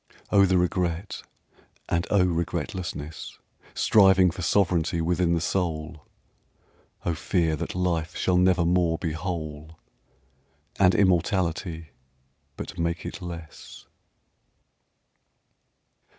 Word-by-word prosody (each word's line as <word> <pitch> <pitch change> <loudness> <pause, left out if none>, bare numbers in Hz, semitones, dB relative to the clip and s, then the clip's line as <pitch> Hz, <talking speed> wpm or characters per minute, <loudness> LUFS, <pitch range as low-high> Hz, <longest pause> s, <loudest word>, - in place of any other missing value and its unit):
Oh, 100 -1 +5
the 95 0 +3
regret, 90 +1 -1 0.7
and 85 +1 -1
oh, 100 -3 +4
regretlessness, 85 -2 -4 0.4
Striving 95 -3 +5
for 90 - -8
sovranty 85 -2 +1
within 85 +1 +1
the - - 0
soul! 80 -3 -3 1.0
Oh, 85 - +1
fear 85 -1 0
that 85 +2 -5
life 85 -2 -1
shall 90 -1 +1
never 90 -1 +3
more 85 -1 +2
be 80 -1 -3
whole, 80 -2 -5 1.0
And 95 -2 +5
immortality 85 -3 0 0.7
but 90 - -7
make 85 0 -2
it - - -6
less! 85 -3 -9
85 Hz, 100 wpm, -26 LUFS, 80-90 Hz, 1.0 s, Oh